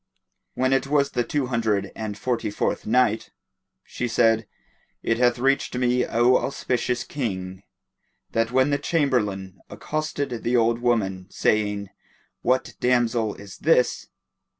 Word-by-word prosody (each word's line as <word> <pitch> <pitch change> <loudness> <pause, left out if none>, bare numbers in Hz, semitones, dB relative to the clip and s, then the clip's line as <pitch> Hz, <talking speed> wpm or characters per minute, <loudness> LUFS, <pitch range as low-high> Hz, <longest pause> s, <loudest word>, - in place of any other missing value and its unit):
When 130 +1 +2
it 135 0 +1
was 140 -1 +2
the 120 - 0
Two 140 +3 -1
Hundred 110 -5 0
and 105 -2 -5
Forty 120 -3 -1
fourth 105 - -2
Night, 115 -1 +2 0.5
She 125 - -4
said, 115 -1 +2 0.6
It 115 0 0
hath 120 0 +3
reached 135 +1 +1
me, 125 0 +1
O 120 +2 +4
auspicious 125 -2 -1
King, 95 -8 -4 0.7
that 115 0 +1
when 130 +3 +3
the 140 - +1
Chamberlain 105 - 0
accosted 140 +1 -3
the 120 +1 +1
old 115 0 +2
woman, 100 -7 0
saying, 105 -2 0 0.5
"What 130 +1 +1
damsel 120 -3 +1
is 100 -1 -12
this?" 150 -6 +2
120 Hz, 130 wpm, -24 LUFS, 105-130 Hz, 0.7 s, O